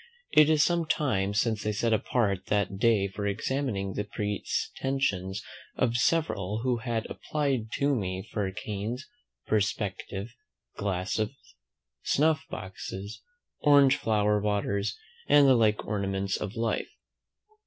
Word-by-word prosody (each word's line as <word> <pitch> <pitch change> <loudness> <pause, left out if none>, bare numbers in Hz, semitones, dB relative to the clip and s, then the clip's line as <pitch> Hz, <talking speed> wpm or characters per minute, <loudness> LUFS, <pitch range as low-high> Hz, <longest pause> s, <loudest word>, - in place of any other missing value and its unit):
It 155 0 +6
is 155 -2 +5
some 170 -2 +1
time 100 -11 0
since 110 0 +1
I 105 - 0
set 110 +2 +1
apart 105 -3 0
that 100 -2 0
day 110 -4 +3
for 100 +1 -4
examining 100 -2 -1
the 105 - -2
pretensions 105 0 -2 0.3
of 120 -2 +1
several 115 - +1
who 125 -2 +1
had 115 -2 -2
applied 135 -7 -2
to 140 +1 +2
me 95 -5 -3
for 100 -2 -1
canes, 105 +5 -5 0.4
perspective 105 0 -2 0.4
glasses, 100 +4 -1 0.7
snuff 155 +1 +2
boxes, 95 +2 -7 0.4
orange 140 -2 +6
flower 105 -1 +1
waters, 100 0 -1 0.3
and 145 -1 +6
the 135 - +7
like 110 -3 +2
ornaments 100 -1 -1
of 105 -1 -4
life. 115 -1 -1
105 Hz, 120 wpm, -28 LUFS, 100-130 Hz, 0.7 s, the